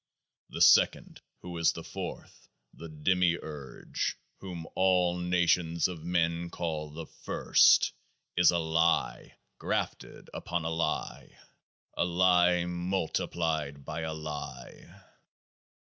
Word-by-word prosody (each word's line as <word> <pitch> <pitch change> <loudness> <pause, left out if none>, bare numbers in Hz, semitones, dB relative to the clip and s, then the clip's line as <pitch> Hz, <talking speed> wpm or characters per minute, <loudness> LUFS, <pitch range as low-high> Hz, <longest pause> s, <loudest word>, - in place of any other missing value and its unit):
The - - +1
Second, - - +4 0.2
who 90 -1 -7
is 85 - +3
the - - -8
Fourth, - - -8 0.2
the 85 - -10
Demiurge, 80 -3 -1 0.2
whom 90 -4 -7
all 90 -2 +2
nations 90 -1 +2
of 85 -4 -8
Men 85 0 0
call 80 -3 -4
The 80 +2 -8
First, - - +3 0.4
is 90 0 +5
a 85 - +3
lie 80 0 0 0.2
grafted - - -4
upon 85 -2 -3
a 80 - -1
lie, 80 +1 -3 0.6
a - - +1
lie 90 0 +3
multiplied 80 -5 -2
by 80 +2 -4
a 80 0 -3
lie. 75 -1 -8
85 Hz, 110 wpm, -29 LUFS, 80-90 Hz, 0.6 s, is